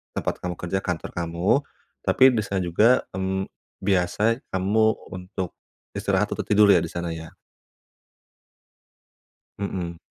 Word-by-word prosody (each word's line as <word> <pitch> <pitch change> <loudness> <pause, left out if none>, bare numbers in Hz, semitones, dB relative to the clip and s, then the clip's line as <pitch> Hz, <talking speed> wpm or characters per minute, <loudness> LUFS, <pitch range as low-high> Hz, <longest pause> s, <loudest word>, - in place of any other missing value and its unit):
tempat - - -2
kamu 90 0 -4
kerja 90 +2 -2
kantor 90 -4 -3
kamu, 85 +7 +1 0.5
tapi 130 0 +6
di 120 - 0
sana 100 -2 -1
juga, 105 +9 +4
mmm, 95 0 -1 0.4
biasa 100 +5 +2
kamu 95 +4 +1 0.3
untuk, 90 0 -5 0.5
istirahat - - +1
atau - - -3
tidur 105 0 +5
ya 95 - +7
di 85 - -2
sana 85 +1 -4
ya? 80 0 -8 2.3
Mhm. 90 -4 -3
95 Hz, 125 wpm, -24 LUFS, 85-100 Hz, 2.3 s, ya